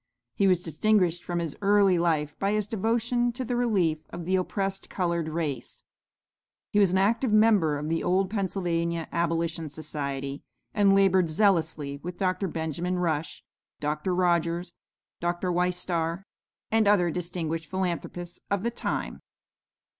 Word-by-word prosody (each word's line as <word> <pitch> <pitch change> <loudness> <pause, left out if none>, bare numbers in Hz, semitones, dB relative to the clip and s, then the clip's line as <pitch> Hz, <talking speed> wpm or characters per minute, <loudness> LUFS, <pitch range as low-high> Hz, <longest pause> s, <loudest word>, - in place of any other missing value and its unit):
He 200 - +2
was 180 -2 +3
distinguished 175 -1 +1
from 175 - -3
his 165 -4 -2
early 200 -3 +4
life 155 -3 +1
by 200 +1 +1
his 210 -1 +1
devotion 230 +3 0
to 255 +2 -4
the 245 +1 -2
relief 195 -10 +1
of 170 -1 -7
the 185 +2 +1
oppressed 195 +1 -2
colored 170 -3 -1
race. 155 -4 -4 0.9
He 210 - +3
was 195 -3 +5
an 190 - +2
active 225 +5 +2
member 210 -8 +4
of 150 +1 -4
the 165 +1 -1
old 185 +2 +2
Pennsylvania 170 -5 -1
Abolition 165 -1 -1
Society, 140 -2 -4 0.3
and 200 -2 +4
labored 190 -3 +4
zealously 160 -6 +1
with 175 +1 -6
Dr. 190 +1 0
Benjamin 165 +2 -2
Rush, 160 -3 -2 0.4
Dr. 150 +5 -1
Rogers, 175 -1 +1 0.5
Dr. 175 +1 -1
Wistar, 175 -1 -1 0.5
and 220 -1 +3
other 180 -4 +4
distinguished 165 -2 -3
philanthropists 175 -1 -3
of 200 -1 0
the 235 - 0
time. - - -3
175 Hz, 140 wpm, -27 LUFS, 165-195 Hz, 0.9 s, was